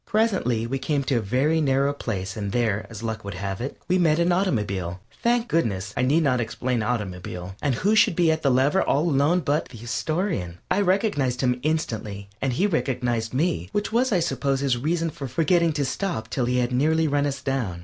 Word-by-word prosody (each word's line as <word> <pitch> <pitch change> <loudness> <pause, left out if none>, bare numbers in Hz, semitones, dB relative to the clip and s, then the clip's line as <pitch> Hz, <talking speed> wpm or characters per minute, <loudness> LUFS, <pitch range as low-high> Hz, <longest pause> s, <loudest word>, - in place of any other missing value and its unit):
Presently 195 - +1
we 135 +3 -2
came 145 0 0
to 135 -2 +1
a - - +1
very 135 +10 +1
narrow 140 0 +2
place 95 -8 -4
and 100 -2 -3
there, 110 -3 0
as 115 -1 -8
luck 110 -1 -3
would 100 - -6
have 100 +1 -4
it, 135 - -4
we 185 +1 +2
met 160 -3 +3
an 170 +1 +2
automobile. 105 - -1 0.2
Thank 240 0 +2
goodness, 105 - -1
I - - 0
need 145 +6 +3
not 130 -4 +2
explain 120 +1 -2
automobile. 95 -5 -4
And 140 -4 +1
who 200 - +1
should 205 - +4
be 170 -2 +4
at 160 0 -1
the 140 - +2
lever 135 +8 +3
all 150 +5 +1
alone 155 +4 +3
but 150 0 0
the 120 - -12
Astorian. 135 - -2
I 205 - +3
recognized 180 - +1
him 125 -1 +1
instantly, 110 -10 -2
and 135 -2 0
he 180 +11 +1
recognized 125 - -1
me, 130 - 0
which 205 +1 -1
was, 250 +2 +2
I 185 -4 +3
suppose, 140 -4 0
his 135 -3 +2
reason 165 +6 -1
for 140 -2 -6
forgetting 165 +6 +2
to 145 -1 0
stop 130 - -3
till 125 - 0
he 125 +1 0
had 125 0 +1
nearly 155 +5 +2
run 145 0 +1
us 140 -1 -3
down. 130 -10 -2
135 Hz, 210 wpm, -24 LUFS, 115-165 Hz, 0.2 s, should